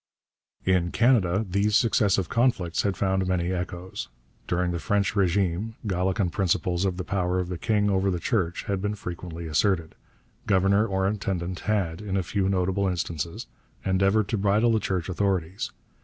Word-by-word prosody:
In 90 -2 +2
Canada 110 -4 +3
these 100 +3 +1
successive 100 -6 +3
conflicts 115 -8 +1
had 100 -2 -1
found 95 -1 +1
many 90 -1 0
echoes. 90 0 -5 0.4
During 90 0 0
the 85 - -2
French 100 +4 +1
régime 100 +2 +1
Gallican 95 -1 0
principles 90 0 0
of 90 -2 -1
the 90 - -3
power 90 0 -1
of 90 -1 -2
the 90 - -3
king 105 -1 +1
over 95 -1 +2
the 90 -2 -1
Church 90 -4 -1
had 100 -3 -2
been 105 +1 -1
frequently 85 -3 -7
asserted; 80 +1 +1 0.5
governor 100 +2 +3
or 95 -2 0
intendant 95 -3 -2
had, 100 -5 -1
in 100 -2 -2
a 95 - 0
few 95 +2 0
notable 95 +1 +1
instances, 85 -2 -3 0.4
endeavoured 95 +2 +2
to 110 - 0
bridle 105 +4 +3
the 110 - +3
Church 90 -5 -2
authorities. 95 +2 -1
95 Hz, 160 wpm, -26 LUFS, 90-100 Hz, 0.5 s, Canada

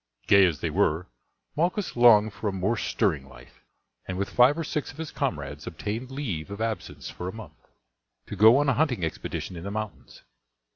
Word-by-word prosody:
Gay 100 -1 +6
as 80 -5 -3
they - - -1
were 80 +4 +1 0.5
Malchus 180 +5 -1
longed 110 -3 +6
for 110 - -4
a - - +1
more 95 +4 0
stirring 70 -10 -1
life, - - -16 0.5
and 95 - -4
with 100 - -2
five 125 +5 +5
or 165 - -2
six 150 -1 -3
of 145 - -17
his 160 -1 -6
comrades 75 - -4
obtained 105 +9 -4
leave 115 - -4
of 100 0 -7
absence 110 -1 -4
for 90 - -6
a - - -5
month, 110 +2 -12 0.6
to - - -7
go 110 +4 +7
on 145 0 +2
a 135 - +4
hunting 125 - +1
expedition 80 +3 -5
in 85 - -7
the 100 - -4
mountains. 110 0 -7
110 Hz, 195 wpm, -26 LUFS, 90-135 Hz, 0.6 s, go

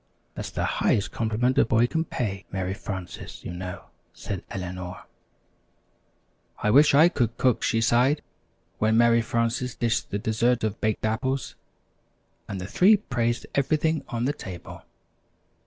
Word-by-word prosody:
"That's - - -5
the - - -3
highest 100 - +1
compliment 115 +3 +1
a - - +7
boy 115 +1 +3
can 160 +6 -1
pay, 100 -9 -3
Mary 95 -1 -2
Frances, 95 -3 -7
you - - -5
know," 90 0 -6 0.3
said - - -5
Eleanor. 90 -1 -6 1.5
"I 105 - +1
wish 145 +3 +6
I 155 +4 +8
could 120 -10 -1
cook," 125 -3 +2
she 115 - +1
sighed, 125 +6 +3 0.6
when 110 +1 +3
Mary 115 0 +5
Frances 115 +2 -1
dished 115 -1 -1
the 100 - -2
dessert 110 +3 +1
of 110 -1 -2
Baked 110 0 0
Apples, 130 +5 -1 0.9
and 100 - -5
the 90 - -5
three 190 - +5
praised 120 - -1
everything 155 +3 +1
on 120 0 -2
the 140 - +1
table. 90 - -9
115 Hz, 145 wpm, -26 LUFS, 100-130 Hz, 1.5 s, I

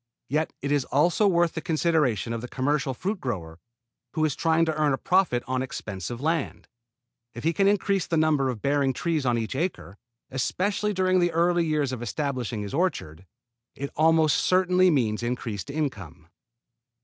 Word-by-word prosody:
Yet 155 +4 0
it 140 - -1
is 145 -2 +2
also 175 +8 +2
worth 175 -3 +2
the 160 - -4
consideration 155 - +1
of 115 - -4
the 125 - -6
commercial 135 +1 -1
fruit 195 - -3
grower 85 -10 -5 0.6
who 155 - +2
is 150 - -1
trying 165 0 +2
to 160 - 0
earn 150 -2 +1
a - - 0
profit 180 -10 +2
on 130 0 -1
expensive 110 -3 -5
land. 160 +1 -2 0.7
If 120 - -7
he 165 - +2
can 195 +3 +2
increase 200 -2 +1
the 165 - 0
number 155 -4 +2
of 120 -5 -5
bearing 140 -1 +2
trees 155 -2 -1
on 120 -1 +2
each 115 +3 -3
acre, 135 - -3 0.3
especially 200 +10 -1
during 185 -1 +2
the 175 -1 +2
early 170 0 +2
years 150 -4 0
of 125 -2 -5
establishing 125 -4 -3
his 100 - -7
orchard, 95 - -2 0.5
it 140 0 -5
almost 160 0 +4
certainly 185 0 +3
means 120 -9 +1
increased 120 -2 -4
income. 105 - -4
145 Hz, 175 wpm, -26 LUFS, 125-170 Hz, 0.7 s, almost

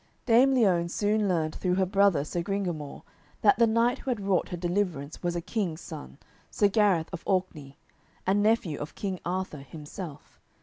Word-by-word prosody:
Dame 255 +3 +5
Liones 180 -8 +3
soon 210 0 +1
learned 160 -4 0
through 180 -1 -1
her 190 0 +2
brother 195 -5 +3
Sir 170 +3 -2
Gringamore 175 -6 -3 0.4
that 210 +1 +5
the 230 - +6
knight 230 +3 +2
who - - -6
had 240 -4 0
wrought 195 -2 0
her 175 - -4
deliverance 175 -5 -2
was 175 0 -1
a 170 - -1
king's 180 -4 -2
son, 155 -4 -9 0.3
Sir 205 - +2
Gareth 195 -6 +2
of 180 - -5
Orkney, 180 -8 -2 0.5
and 195 +2 +2
nephew 210 -8 +1
of 150 - -7
King 190 -3 -3
Arthur 180 -3 -3
himself. 150 +2 -9
185 Hz, 175 wpm, -28 LUFS, 165-205 Hz, 0.5 s, the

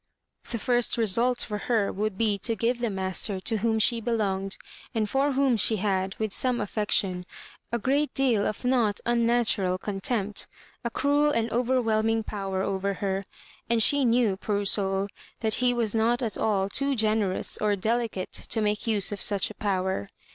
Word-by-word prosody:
The 235 - -2
first 240 +1 +1
result 235 +3 +2
for 210 -1 -4
her 220 -5 +2
would 210 0 -2
be 210 -2 +1
to 230 +3 -1
give 235 +2 0
the 240 -1 -1
master 190 0 -1
to 220 +5 0
whom 220 +1 +1
she 230 +1 +3
belonged, 195 -4 -1 0.4
and 220 -2 +1
for 275 +5 +1
whom 265 -3 +2
she 220 - +3
had, 190 -2 -1
with 215 -2 -2
some 250 -2 +1
af 205 -2 -4
fection, 195 -4 0 0.5
a 235 - +1
great 280 +5 +1
deal 245 -7 +2
of 215 - -5
not 235 -5 +2
unnatural 235 -6 +2
contempt, 205 +1 -2 0.4
a 235 - -1
cruel 290 +4 +2
and 230 -5 0
overwhelming 225 -3 +1
power 195 -3 -3
over 195 0 -1
her; 195 0 -2 0.4
and 230 -1 +4
she 285 +3 +4
knew, 230 -5 +2
poor 205 0 -2
soul, 195 0 +1 0.3
that 220 -2 0
he 250 0 +4
was 235 -4 0
not 235 +3 +1
at 220 -4 -1
all 195 -3 +1
too 275 +7 0
generous 215 -4 +1
or 210 -1 +2
delicate 220 -1 -2
to 225 - -3
make 210 +1 -1
use 210 -4 +1
of 205 - -4
such 200 0 +1
a - - -9
power. 190 - -2
220 Hz, 175 wpm, -26 LUFS, 200-235 Hz, 0.5 s, and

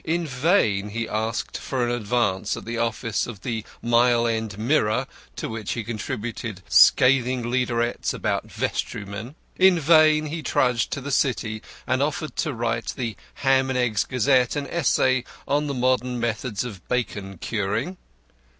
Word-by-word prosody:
In 170 +1 -1
vain 125 - +1
he 115 +2 -3
asked 110 +1 -2
for 130 -3 -1
an 120 - -1
advance 105 -4 0
at - - -8
the 115 +1 -3
office 115 -1 -1
of 110 -6 -8
the 115 +2 -3 0.2
Mile 120 0 +4
End 110 -3 -2
Mirror, 110 -2 +1 0.3
to - - -4
which 110 -2 -4
he 115 - -3
contributed 110 -2 -5
scathing 125 -1 +5
leaderettes 120 -1 0
about - - -2
vestrymen. 105 +6 -4 0.2
In 185 -2 +5
vain 155 0 +5
he 160 +2 -4
trudged 125 -6 +1
to 140 - -4
the 140 +2 -5
City 110 -6 0 0.2
and 130 +1 +1
offered 150 +1 -2
to 155 - 0
write 115 -2 -2
the 115 -4 -3 0.3
Ham 135 0 +4
and 130 - 0
Eggs 120 -5 +1
Gazette 125 -1 +2
an 145 -1 -2
essay 130 -7 +2 0.2
on 145 +1 +1
the 140 - -2
modern 125 0 +1
methods 115 -1 -2
of 105 -7 -8
bacon 100 -6 -2
curing. 110 - -2
120 Hz, 155 wpm, -24 LUFS, 110-135 Hz, 0.3 s, scathing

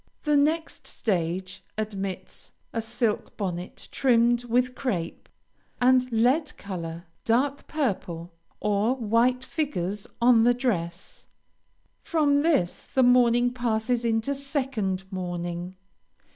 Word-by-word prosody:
The 300 -1 +2
next 310 +3 +1
stage 185 -2 -2
admits 195 -3 -5 0.2
a 230 - -1
silk 225 -1 -2
bonnet 180 -3 -5
trimmed 240 -2 +3
with 250 +1 +1
crape, 185 -12 -3 0.5
and 255 0 +4
lead 260 +7 +2
color, 170 -3 -6 0.2
dark 270 +5 +1
purple, 180 - -2 0.3
or 210 +4 +1
white 245 +2 +2
figures 210 - -2
on 235 -1 +6
the 245 +1 +4
dress. 185 -9 -3 0.7
From 290 -3 +2
this 290 - +1
the 260 - +2
mourning 245 0 +4
passes 240 0 0
into 225 +3 +1
second 265 -9 -2
mourning. 175 -1 -4
235 Hz, 105 wpm, -26 LUFS, 190-255 Hz, 0.7 s, on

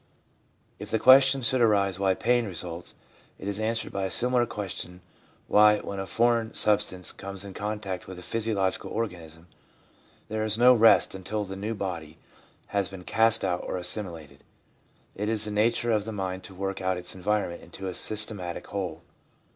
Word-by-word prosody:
If - - -8
the 110 - +1
question 135 +2 +6
should 130 +1 +2
arise 100 -4 +2
why 95 -1 +2
pain 120 +2 +1
results, 85 -2 -6 0.4
it 95 - -8
is 100 0 -2
answered 110 +1 -1
by 100 -1 -1
a - - -2
similar 125 +2 +2
question 95 -4 -6 0.5
why, 105 0 +6
when 100 -1 -6
a 95 - -4
foreign 115 0 +1
sub 105 -1 +6
stance 90 -1 -4
comes 100 0 -8
in 100 - -8
contact 105 -2 -4
with 95 - -8
a 90 - -10
physiological 105 -2 -1
organism, 85 -7 -5 0.8
there 110 0 -2
is 110 0 0
no 125 +2 +7
rest 115 -1 +5
until 100 +3 -4
the 95 0 -7
new 105 +4 -4
body 85 -6 -5 0.5
has 100 -2 0
been 95 -2 -10
cast 110 +2 +3
out 90 -1 -1
or - - -3
assimilated. 85 -6 -5 0.7
It 105 +2 -3
is 110 -1 +2
the 105 - -4
nature 115 +3 +1
of 105 -2 +1
the 110 - -4
mind 95 -2 -4
to 95 - -10
work 95 +1 -4
out 95 -1 0
its 90 - -2
environment 95 -2 -2
into 95 +2 -8
a 90 - -4
systematic 105 -4 -1
whole. 90 -5 -5
100 Hz, 180 wpm, -27 LUFS, 95-110 Hz, 0.8 s, no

